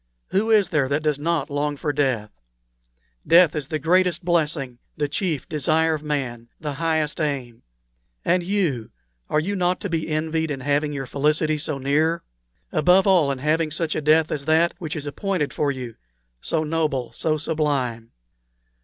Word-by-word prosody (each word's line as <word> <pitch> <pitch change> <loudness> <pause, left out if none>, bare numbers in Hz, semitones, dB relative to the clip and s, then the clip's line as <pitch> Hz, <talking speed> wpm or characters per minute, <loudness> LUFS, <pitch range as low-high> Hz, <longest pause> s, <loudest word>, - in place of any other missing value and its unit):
Who 210 +4 +1
is 210 -5 +4
there 140 -4 +1
that 145 +2 0
does 150 -2 0
not 160 -1 -1
long 145 0 -1
for 145 +1 -2
death? 130 -7 0 1.0
Death 165 -1 +6
is 150 -3 -3
the 155 - -2
greatest 175 +3 +2
blessing, 150 -7 0 0.2
the 150 -1 0
chief 155 -1 -2
desire 160 +2 +2
of 155 - -3
man 130 -6 -3
the 150 -2 -4
highest 160 0 -1
aim. 130 -6 -3 0.6
And 180 0 +3
you 170 - -1 0.4
are 150 - +2
you 195 +6 -2
not 180 -1 +1
to 200 - -3
be 160 -1 -1
envied 160 +1 -1
in 135 -2 -4
having 145 +2 +1
your 135 -2 -4
felicity 150 +3 +1
so 150 -1 -2
near? 155 +5 +1 0.5
above 180 +5 +4
all, 180 -7 +4
in 135 - -3
having 155 +4 +1
such 155 +1 -2
a - - -2
death 155 +1 +3
as 140 -2 -3
that 160 +2 +3
which 160 -2 -4
is 150 -2 -5
appointed 165 +1 -2
for 145 - 0
you 125 -4 -6 0.5
so 160 -1 -1
noble, 150 -6 -1
so 155 +6 -1
sublime? 140 -8 -1
155 Hz, 170 wpm, -23 LUFS, 140-165 Hz, 1.0 s, Death